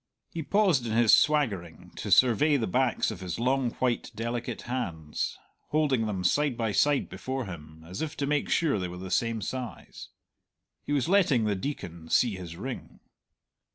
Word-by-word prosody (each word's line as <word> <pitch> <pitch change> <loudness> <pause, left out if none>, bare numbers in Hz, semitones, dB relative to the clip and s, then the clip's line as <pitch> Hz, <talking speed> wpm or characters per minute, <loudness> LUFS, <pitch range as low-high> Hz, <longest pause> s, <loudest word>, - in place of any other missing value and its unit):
He 165 - -4
paused 170 - +2
in 110 - -2
his 115 -1 +5
swaggering 105 - +2
to - - -4
survey 130 +5 +5
the 115 - -1
backs 125 +3 +1
of 105 - -7
his 90 -3 -4
long 130 +1 +1
white 125 -2 -1
delicate 120 +2 -4
hands, 85 -12 -3 0.3
holding 145 -7 +1
them 95 -3 -3
side 140 +6 +2
by 115 -3 0
side 145 +7 +2
before 130 -1 -4
him, 80 -3 -10
as 90 +3 -6
if 160 -2 -4
to 140 - -1
make 145 0 0
sure 150 -11 +2
they 90 - -2
were 90 0 -8
the 95 0 -7
same 115 -3 0
size. 130 -3 -6 0.7
He - - -7
was 145 0 +1
letting 170 - +4
the 105 - +1
Deacon 90 - -5
see 120 -4 +3
his 85 -3 -8
ring. 130 +7 -7
120 Hz, 175 wpm, -28 LUFS, 95-140 Hz, 0.7 s, his